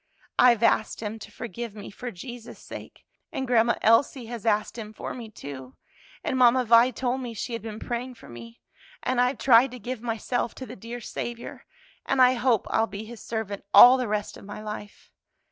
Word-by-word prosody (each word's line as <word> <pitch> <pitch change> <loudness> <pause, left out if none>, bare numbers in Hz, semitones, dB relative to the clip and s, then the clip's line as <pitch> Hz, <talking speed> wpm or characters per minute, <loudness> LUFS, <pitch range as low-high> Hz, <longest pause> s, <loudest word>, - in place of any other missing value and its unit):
I've 240 -2 +6
asked 220 -1 +2
Him 215 +1 -4
to - - -11
forgive 230 0 -7
me 205 -1 -9
for 245 +5 -6
Jesus' 240 +3 -9
sake, - - -11 0.3
and 265 - -3
Grandma 235 -1 +3
Elsie 235 +3 +3
has 230 -1 -6
asked 215 0 +1
Him 215 -2 -7
for - - -6
me, 235 -3 -8
too, 135 -9 -9 0.5
and 260 - -1
Mamma 250 0 +5
Vi 230 +2 +6
told 255 +1 -2
me 240 -2 -6
she 235 +3 -4
had 230 - -3
been 215 -1 -7
praying 245 +2 -4
for - - -15
me. 115 -1 -11 0.4
And 255 -1 +1
I've 250 +2 +1
tried 250 0 +5
to 250 - -9
give 245 +1 -6
myself 235 +1 -2
to 260 - -7
the - - -9
dear 235 +4 -8
Saviour, 235 +1 -6 0.4
and 270 - -1
I 255 0 +7
hope 245 -3 +1
I'll 225 - +2
be 210 +1 -7
His 235 0 -10
servant 220 -3 -4
all 250 +2 +10
the 250 -2 -2
rest 210 0 -3
of - - -13
my 205 - -8
life. 210 -1 -8
235 Hz, 200 wpm, -26 LUFS, 215-250 Hz, 0.5 s, all